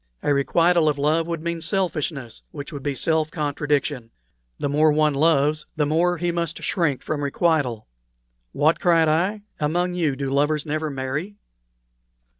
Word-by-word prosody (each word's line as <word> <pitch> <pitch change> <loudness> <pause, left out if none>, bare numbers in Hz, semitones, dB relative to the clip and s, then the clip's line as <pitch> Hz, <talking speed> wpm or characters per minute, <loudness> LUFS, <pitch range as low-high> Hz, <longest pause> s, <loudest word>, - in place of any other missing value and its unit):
A 145 - +2
requital 165 +3 +3
of 145 - -1
love 155 +3 +1
would 165 -2 -4
mean 170 -1 -3
selfishness, 160 - -2
which 145 +1 -8
would 140 - -6
be 140 0 -2
self 160 +2 +1
contradiction. 145 -5 -2 0.5
The - - -2
more 150 +2 +3
one 150 0 +2
loves, 150 0 +2
the 150 -2 +1
more 170 +4 +1
he 175 +1 -1
must 170 -2 -3
shrink 150 -8 0
from 145 -2 -3
requital." 140 -6 0 0.7
"What!" 155 - +2
cried 165 -2 +3
I, 185 +7 +1 0.2
"among 175 +4 0
you 160 -6 0
do 135 0 -3
lovers 145 +1 +1
never 155 +1 -2
marry?" 140 +8 -4
155 Hz, 155 wpm, -23 LUFS, 145-170 Hz, 0.7 s, requital